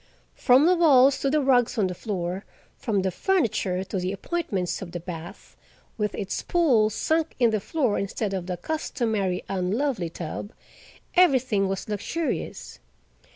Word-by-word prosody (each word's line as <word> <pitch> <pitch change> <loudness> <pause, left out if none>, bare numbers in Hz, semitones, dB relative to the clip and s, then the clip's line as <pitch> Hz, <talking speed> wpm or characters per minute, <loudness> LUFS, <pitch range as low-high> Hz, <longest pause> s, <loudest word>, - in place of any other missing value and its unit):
From 255 +4 +4
the 365 +2 +5
walls 280 -5 +5
to 275 - 0
the 300 +2 +2
rugs 250 -2 +3
on 210 - +3
the 185 - -2
floor, 185 -1 -4 0.3
from 205 -5 -1
the 190 - 0
furniture 200 - 0
to 190 0 -4
the 180 +1 -2
appointments 200 - -2
of 175 -3 -8
the 175 - -3
bath, 170 -1 -9 0.4
with 210 -1 -2
its 195 -2 -3
pool 260 -12 +3
sunk 320 +8 0
in 235 -3 +3
the 215 - +1
floor 250 - 0
instead 200 +1 -2
of 185 -2 -3
the 180 -1 -3
customary 220 - -2
unlovely 195 - -1
tub, 170 +6 -6 0.6
everything 260 - +3
was 195 -1 -3
luxurious. 225 - -4
215 Hz, 155 wpm, -25 LUFS, 185-275 Hz, 0.6 s, the